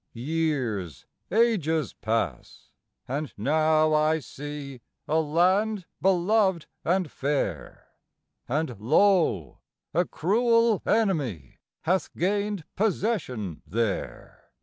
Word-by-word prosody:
Years, 125 Hz, -, -2 dB, 0.2 s
ages 175 Hz, -, +2 dB
pass 105 Hz, -, -3 dB, 0.4 s
and 145 Hz, +3 st, -3 dB
now 155 Hz, +6 st, +3 dB
I 155 Hz, +1 st, +3 dB
see 145 Hz, -2 st, -8 dB, 0.3 s
a 160 Hz, +2 st, +2 dB
land 185 Hz, +6 st, +2 dB, 0.2 s
beloved 190 Hz, -1 st, +2 dB, 0.2 s
and 180 Hz, -2 st, 0 dB
fair; 135 Hz, -, -3 dB, 0.6 s
And 130 Hz, -5 st, -1 dB
lo! 150 Hz, -, +2 dB, 0.3 s
a 175 Hz, +3 st, +2 dB
cruel 230 Hz, +5 st, +2 dB
enemy 150 Hz, -, 0 dB, 0.2 s
hath 185 Hz, +3 st, 0 dB
gained 200 Hz, 0 st, -1 dB
possession 180 Hz, -, -1 dB
there. 105 Hz, +3 st, -3 dB
155 Hz, 85 wpm, -26 LUFS, 125-190 Hz, 0.6 s, now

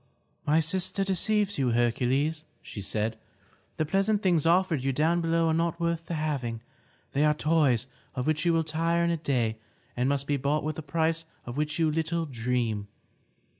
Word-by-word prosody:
"My 155 Hz, +2 st, +4 dB
sister 185 Hz, +4 st, 0 dB
deceives 200 Hz, +1 st, +1 dB
you, 125 Hz, -3 st, +2 dB
Hercules," 130 Hz, +6 st, +1 dB, 0.2 s
said 105 Hz, +2 st, -2 dB
she. 110 Hz, -, -26 dB, 0.6 s
"The 155 Hz, -, +1 dB
pleasant 195 Hz, +5 st, +1 dB
things 170 Hz, -5 st, +3 dB
offered 170 Hz, -5 st, +3 dB
you 135 Hz, -, +1 dB
down 160 Hz, +5 st, +2 dB
below 165 Hz, 0 st, +2 dB
are -, -, +2 dB
not 170 Hz, +1 st, 0 dB
worth 170 Hz, -1 st, -1 dB
the 170 Hz, -, -3 dB
having. 135 Hz, -7 st, -2 dB, 0.5 s
They 140 Hz, -, +1 dB
are 150 Hz, 0 st, +4 dB
toys 150 Hz, -7 st, +2 dB, 0.3 s
of 125 Hz, -, -2 dB
which 155 Hz, 0 st, +1 dB
you 170 Hz, -, +3 dB
will 165 Hz, -1 st, +2 dB
tire 165 Hz, +2 st, 0 dB
in 170 Hz, -, +2 dB
a 170 Hz, -, 0 dB
day 125 Hz, -8 st, 0 dB, 0.4 s
and 125 Hz, +2 st, +1 dB
must 140 Hz, -1 st, 0 dB
be 145 Hz, 0 st, 0 dB
bought 140 Hz, +3 st, 0 dB
with 155 Hz, 0 st, -3 dB
a -, -, -3 dB
price 160 Hz, +2 st, 0 dB, 0.2 s
of 120 Hz, -, -6 dB
which 150 Hz, +1 st, -1 dB
you 160 Hz, -2 st, +2 dB
little 165 Hz, +1 st, -1 dB
dream. 115 Hz, -5 st, -1 dB
155 Hz, 185 wpm, -28 LUFS, 130-165 Hz, 0.6 s, My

